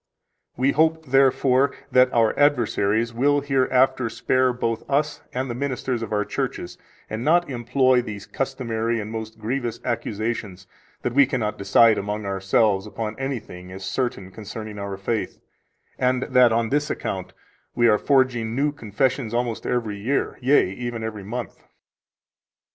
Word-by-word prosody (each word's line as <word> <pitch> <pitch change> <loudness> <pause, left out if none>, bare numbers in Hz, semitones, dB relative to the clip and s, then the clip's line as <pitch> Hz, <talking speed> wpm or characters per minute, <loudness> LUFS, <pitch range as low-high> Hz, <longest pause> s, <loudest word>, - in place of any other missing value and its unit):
We 130 +3 +3
hope, 160 +1 +2
therefore, 135 0 +3 0.2
that 125 0 +5
our 115 -2 +3
adversaries 115 -5 +2
will 145 +4 +2
hereafter 130 -2 +2
spare 130 +2 +1
both 115 -2 -2
us 145 +1 0
and 130 +1 -2
the 120 - -3
ministers 130 -2 -2
of 115 - -5
our 105 -1 0
churches, - - -4 0.3
and 110 +2 -4
not 175 +4 +3
employ 125 +1 +2
these 105 -4 -7
customary 120 -4 -2
and 105 0 -5
most 110 0 -6
grievous 120 +1 -3
accusations, 110 -5 -3 0.4
that 120 - -1
we 140 0 +5
cannot 115 -6 -2
decide 110 +3 +5
among 105 +1 -4
ourselves 95 +1 +1
upon 110 0 -4
anything 110 -9 -5
as 95 0 -7
certain 100 -4 -3
concerning 105 0 -8
our 100 -1 -5
faith, 105 +3 -3 0.6
and 130 0 +1
that, 125 -3 +4
on 115 0 +1
this 145 +2 0
account, 95 -2 -4 0.4
we 120 -1 +4
are 105 -2 +4
forging 125 -5 +1
new 145 +3 +1
confessions 120 -1 -1
almost 120 -2 -2
every 115 -4 -1
year, 130 +7 -1
yea, 130 -6 +3
even 120 +2 -5
every 110 -2 -5
month. 120 +5 -6
120 Hz, 150 wpm, -23 LUFS, 110-130 Hz, 0.6 s, that